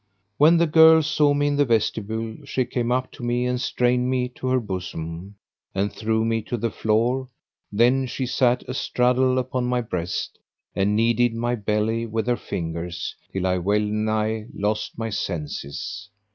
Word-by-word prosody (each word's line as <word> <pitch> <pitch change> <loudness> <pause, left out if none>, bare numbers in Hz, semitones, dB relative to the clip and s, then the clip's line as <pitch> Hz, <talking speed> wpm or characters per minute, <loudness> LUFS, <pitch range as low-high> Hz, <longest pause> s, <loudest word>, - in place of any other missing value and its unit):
When 160 +4 +6
the 170 - +4
girl 160 0 +7
saw 150 -1 +2
me 145 0 +1
in 145 0 +1
the 145 - +5
vestibule, 110 -1 -1
she 130 - -1
came 120 -1 -2
up 130 +1 0
to 130 - -11
me 120 +1 0
and 125 0 -1
strained 125 0 +1
me 125 -1 0
to 130 +1 -6
her 130 0 +3
bosom, 90 -2 -6 0.4
and 100 +2 0
threw 110 0 0
me 115 0 0
to 120 +3 -4
the 115 0 -1
floor; 120 +4 +1 0.4
then 125 +5 +3
she 130 +1 -3
sat 125 0 +2
astraddle 125 0 +1
upon 130 0 -1
my 125 0 +1
breast 90 -6 -4 0.4
and 100 +2 +1
kneaded 115 +1 +2
my 120 +1 -1
belly 110 +1 -1
with 110 0 -2
her 120 0 +2
fingers, 85 -2 -5 0.2
till 95 -1 -2
I 90 0 +1
well 100 +4 +2
nigh 110 +1 -1
lost 105 +1 -2
my 115 -1 -3
senses. 95 +4 -4
115 Hz, 170 wpm, -23 LUFS, 105-125 Hz, 0.4 s, girl